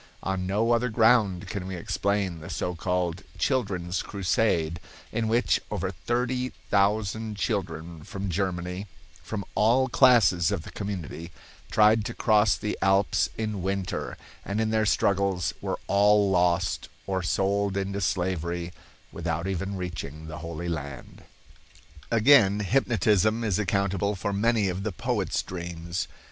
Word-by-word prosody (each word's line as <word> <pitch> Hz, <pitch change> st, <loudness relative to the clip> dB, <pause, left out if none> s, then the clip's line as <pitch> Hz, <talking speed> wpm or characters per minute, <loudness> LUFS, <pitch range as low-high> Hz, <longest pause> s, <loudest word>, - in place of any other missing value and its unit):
On 95 Hz, -1 st, -2 dB
no 105 Hz, +5 st, +1 dB
other 120 Hz, +1 st, +2 dB
ground 110 Hz, -4 st, +3 dB
can 95 Hz, 0 st, -5 dB
we 95 Hz, -, -4 dB
explain 95 Hz, 0 st, -1 dB
the 75 Hz, -, -9 dB
so 90 Hz, -, -2 dB
called 90 Hz, +1 st, -1 dB, 0.2 s
"Children's 95 Hz, -9 st, 0 dB
Crusade," 90 Hz, -4 st, 0 dB, 0.3 s
in 115 Hz, 0 st, -1 dB
which 110 Hz, -, +2 dB
over 95 Hz, -, -2 dB
thirty 125 Hz, +8 st, -2 dB, 0.2 s
thousand 105 Hz, +1 st, +1 dB
children 85 Hz, -7 st, -3 dB
from 100 Hz, +2 st, -5 dB
Germany, 90 Hz, +1 st, -2 dB, 0.3 s
from 100 Hz, +4 st, -5 dB
all 120 Hz, +5 st, +3 dB
classes 115 Hz, -10 st, +5 dB
of 100 Hz, -6 st, -2 dB
the -, -, -10 dB
community, 90 Hz, -4 st, -5 dB, 0.4 s
tried 110 Hz, 0 st, +4 dB
to 115 Hz, -, -5 dB
cross 105 Hz, -2 st, +3 dB
the 105 Hz, -, -3 dB
Alps 95 Hz, 0 st, +3 dB
in 110 Hz, -3 st, -2 dB
winter, 95 Hz, 0 st, -3 dB, 0.3 s
and 100 Hz, +2 st, -3 dB
in 110 Hz, 0 st, +1 dB
their 110 Hz, -1 st, +2 dB
struggles 100 Hz, -3 st, +1 dB
were -, -, -2 dB
all 100 Hz, 0 st, +4 dB
lost 90 Hz, -1 st, +1 dB, 0.2 s
or 95 Hz, -1 st, -1 dB
sold 100 Hz, +3 st, 0 dB
into 100 Hz, +1 st, -2 dB
slavery 85 Hz, -2 st, -1 dB, 0.4 s
without 85 Hz, 0 st, -3 dB
even 95 Hz, +1 st, -2 dB
reaching 80 Hz, -4 st, -6 dB
the 80 Hz, -1 st, -7 dB
Holy 85 Hz, +1 st, -5 dB
Land. 70 Hz, -6 st, -6 dB, 0.8 s
Again, 110 Hz, -4 st, +5 dB
hypnotism 110 Hz, -1 st, +2 dB
is 105 Hz, -3 st, 0 dB
accountable 100 Hz, 0 st, 0 dB
for 100 Hz, +2 st, -3 dB
many 110 Hz, 0 st, +2 dB
of 90 Hz, +1 st, -2 dB
the 110 Hz, +1 st, -2 dB
poet's 85 Hz, -, -1 dB
dreams. 85 Hz, 0 st, -5 dB
95 Hz, 135 wpm, -27 LUFS, 90-105 Hz, 0.8 s, classes